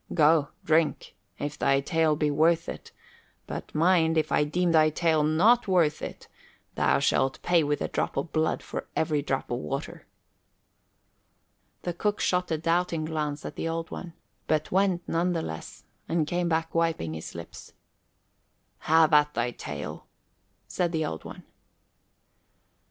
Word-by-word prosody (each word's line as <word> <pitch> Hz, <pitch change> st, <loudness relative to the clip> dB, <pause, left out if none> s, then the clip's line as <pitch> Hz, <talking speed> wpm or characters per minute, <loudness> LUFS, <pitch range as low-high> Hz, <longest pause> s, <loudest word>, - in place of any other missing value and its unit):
"Go, 155 Hz, -2 st, +4 dB, 0.2 s
drink, 160 Hz, 0 st, +1 dB, 0.2 s
if 145 Hz, +1 st, -5 dB
thy 135 Hz, 0 st, +3 dB
tale 155 Hz, +2 st, +1 dB
be 150 Hz, 0 st, 0 dB
worth 165 Hz, +3 st, +2 dB
it; -, -, -8 dB, 0.5 s
but -, -, -7 dB
mind, 165 Hz, 0 st, +3 dB
if 155 Hz, -, 0 dB
I -, -, +3 dB
deem 175 Hz, +4 st, 0 dB
thy 155 Hz, -1 st, +5 dB
tale 160 Hz, 0 st, +1 dB
not 185 Hz, +12 st, +4 dB
worth 170 Hz, -5 st, +2 dB
it, -, -, -7 dB, 0.5 s
thou -, -, +2 dB
shalt 135 Hz, 0 st, +1 dB
pay 175 Hz, -1 st, +4 dB
with 145 Hz, 0 st, -1 dB
a -, -, -1 dB
drop -, -, -2 dB
of 140 Hz, +4 st, -3 dB
blood 160 Hz, 0 st, 0 dB
for -, -, -6 dB
every 150 Hz, -2 st, +1 dB
drop 135 Hz, -3 st, -3 dB
of 120 Hz, -, -1 dB
water." 75 Hz, -, -5 dB, 1.8 s
The 175 Hz, -, -2 dB
cook 205 Hz, +4 st, -1 dB
shot 180 Hz, 0 st, +1 dB
a 160 Hz, -, 0 dB
doubting 165 Hz, 0 st, 0 dB
glance 150 Hz, -2 st, -3 dB
at -, -, -6 dB
the 165 Hz, -, -3 dB
Old 165 Hz, 0 st, -4 dB
One, 175 Hz, -2 st, -7 dB, 0.3 s
but 155 Hz, -1 st, 0 dB
went 190 Hz, -2 st, +1 dB
none 175 Hz, +2 st, +1 dB
the 165 Hz, -2 st, -2 dB
less, 80 Hz, 0 st, -7 dB, 0.3 s
and 165 Hz, -2 st, +1 dB
came 175 Hz, +2 st, -1 dB
back 165 Hz, 0 st, -1 dB
wiping 165 Hz, -, 0 dB
his 80 Hz, +1 st, -7 dB
lips. 85 Hz, 0 st, -10 dB, 1.1 s
"Have 160 Hz, 0 st, +4 dB
at 150 Hz, 0 st, +4 dB
thy 120 Hz, +1 st, 0 dB
tale," -, -, -7 dB, 0.6 s
said 175 Hz, -1 st, -1 dB
the 160 Hz, -1 st, 0 dB
Old 80 Hz, -, -5 dB
One. -, -, -9 dB
160 Hz, 155 wpm, -27 LUFS, 150-170 Hz, 1.8 s, thy